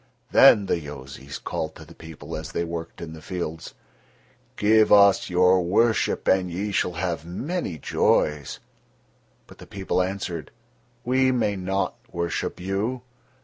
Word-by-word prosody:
Then 100 - +7
the 90 - 0
Yozis 70 -2 -9
called - - -4
to - - -12
the - - -14
people 80 -2 -9
as - - -7
they 85 - -1
worked 85 -1 -6
in 80 -1 -7
the 80 - -11
fields: 80 -2 -6 0.8
"Give 110 +1 +4
us 100 -1 +6
your 90 +1 +4
worship 110 +6 +1
and 95 -1 +3
ye 100 +5 -3
shall 90 -2 0
have 85 -2 -3
many 95 - -4
joys." 75 -1 0 0.9
But - - -17
the - - -12
people 95 -2 -1
answered: 90 -3 -4 0.6
"We 130 +1 +3
may 110 -5 0
not 95 +1 -2
worship 85 -1 -3
you." 100 +7 -2
90 Hz, 145 wpm, -24 LUFS, 85-100 Hz, 0.9 s, Then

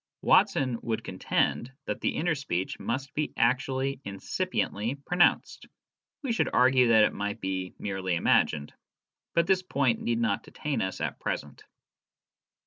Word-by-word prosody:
Watson 130 -3 +3
would 115 -1 -2
contend 115 +6 -1
that - - -4
the - - 0
inner 170 +1 +1
speech 95 - -3
must 135 +2 -3
be 150 0 -1
actually 130 +3 +1
incipiently 100 +3 -2
pronounced; 175 0 +2 0.6
we 265 - -1
should 230 - +1
argue 125 0 +5
that 110 -2 +6
it - - +2
might 105 0 -3
be 95 -1 -3
merely 95 -3 -2
imagined. 75 -3 +2 0.6
But 170 - +4
this 190 0 +3
point 140 -9 0
need 120 -1 0
not 110 -4 +1
detain 150 -2 -3
us 95 - -3
at - - -3
present. - - -5
120 Hz, 140 wpm, -28 LUFS, 100-140 Hz, 0.6 s, that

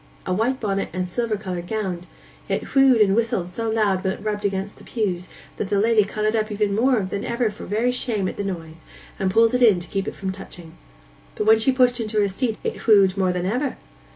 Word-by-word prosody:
'A 185 - -1
white 240 +7 0
bonnet 195 -3 -1
and 185 +1 -1
a - - -3
silver 220 +4 -2
coloured 180 -4 -5
gownd. 185 -5 -3 0.4
It - - -2
whewed 270 -4 +5
and 195 -2 +4
whistled 220 -6 0
so 225 +5 -3
loud 210 -4 +1
when 190 -1 0
it - - -11
rubbed 210 -1 -2
against 195 0 -2
the - - -14
pews 185 -6 -2 0.3
that 200 - -3
the 205 - +2
lady 220 0 +4
coloured 215 +2 -1
up 215 0 0 0.2
more 235 +3 +2
than 200 +1 -4
ever 235 -2 0
for 205 - -10
very 225 +5 +1
shame 225 -6 0
at - - -4
the 205 - -3
noise, 165 -4 -6 0.4
and 190 - +1
pulled 225 +4 +4
it 250 - +1
in 215 -7 +6
to 175 - -6
keep 195 -1 -2
it - - -4
from 190 -1 -3
touching; 180 -3 -11 0.6
but 210 - -2
when 220 0 +6
she 225 +4 +3
pushed 250 -1 +3
into 215 -1 -1
her 205 - +3
seat, 220 +3 -2
it - - -5
whewed 195 -4 +5
more 190 -2 +1
than 180 0 -2
ever. 250 +8 -1
210 Hz, 235 wpm, -23 LUFS, 190-225 Hz, 0.6 s, in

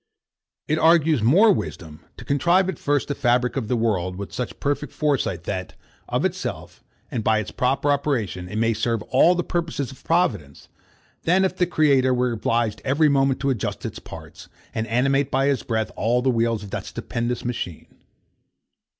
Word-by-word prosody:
It 155 +1 +1
argues 160 -4 +4
more 190 - +5
wisdom 80 - -6
to 120 - -10
contrive 170 +8 +2
at 180 - -5
first 145 -1 0
the 145 - -1
fabric 125 -2 +1
of 130 -6 -2
the 125 - 0
world 95 -6 0
with 100 +1 -7
such 125 - -5
perfect 145 +1 -2
foresight 135 - -1
that, 95 0 -5 0.3
of - - 0
itself, - - -4 0.3
and 115 -3 -2
by 110 0 +3
its 110 - -3
proper 135 +3 +1
operation, 115 -11 -1
it 105 - -7
may 115 +1 +2
serve 115 0 -1
all 165 +10 +4
the 175 - -1
purposes 165 -7 -3
of 135 - -15
providence, 165 - -1 0.5
than 185 +3 +3
if 190 - -1
the 180 - +1
great 175 - -17 0.2
Creator 130 -1 +3
were 125 0 +1
obliged 115 -1 -1
every 150 +3 +3
moment 135 -1 +2
to 140 0 +1
adjust 115 -6 -3
its - - -5
parts, - - -11 0.2
and 110 0 -2
animate 135 +4 +1
by 135 0 +1
his 140 -3 +1
breath 110 -2 -2
all 120 +3 +1
the 130 - +3
wheels 115 -2 0
of 100 - -10
that - - -4
stupendous 120 +1 -4
machine. 115 -9 -4
125 Hz, 185 wpm, -23 LUFS, 110-145 Hz, 0.5 s, more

